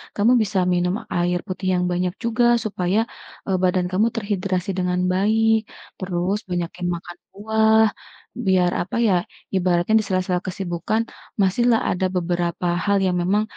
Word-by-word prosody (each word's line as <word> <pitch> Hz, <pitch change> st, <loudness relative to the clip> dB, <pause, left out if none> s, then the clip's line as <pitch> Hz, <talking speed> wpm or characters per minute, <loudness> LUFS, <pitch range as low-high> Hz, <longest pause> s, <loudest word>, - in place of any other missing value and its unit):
kamu 215 Hz, +4 st, +3 dB
bisa 205 Hz, -2 st, 0 dB
minum 180 Hz, 0 st, +1 dB, 0.2 s
air 175 Hz, 0 st, +1 dB
putih 185 Hz, 0 st, -4 dB
yang 180 Hz, -, +1 dB
banyak 180 Hz, 0 st, -1 dB
juga 235 Hz, +1 st, +2 dB, 0.2 s
supaya, 190 Hz, -1 st, 0 dB, 0.5 s
eee, 190 Hz, -2 st, 0 dB
badan 180 Hz, 0 st, +2 dB
kamu 200 Hz, +5 st, +3 dB
terhidrasi 195 Hz, -3 st, -2 dB
dengan 180 Hz, 0 st, 0 dB
baik. 220 Hz, +3 st, +3 dB, 0.4 s
Terus, 185 Hz, +1 st, -1 dB
banyakin 175 Hz, 0 st, -3 dB
makan 175 Hz, +1 st, -9 dB, 0.2 s
buah, 220 Hz, +1 st, +3 dB, 0.6 s
biar 180 Hz, -2 st, +3 dB
apa 180 Hz, -, -5 dB
ya, 200 Hz, -, +3 dB, 0.4 s
ibaratnya 180 Hz, +1 st, +1 dB
di -, -, -1 dB
sela-sela 185 Hz, -1 st, 0 dB
kesibukan, 185 Hz, +3 st, -2 dB, 0.4 s
masihlah 225 Hz, +4 st, +3 dB
ada 185 Hz, +1 st, -1 dB
beberapa 175 Hz, 0 st, -1 dB, 0.2 s
hal 200 Hz, -1 st, +3 dB
yang 180 Hz, -1 st, +1 dB
memang, 200 Hz, +4 st, +2 dB
185 Hz, 140 wpm, -22 LUFS, 180-210 Hz, 0.6 s, kamu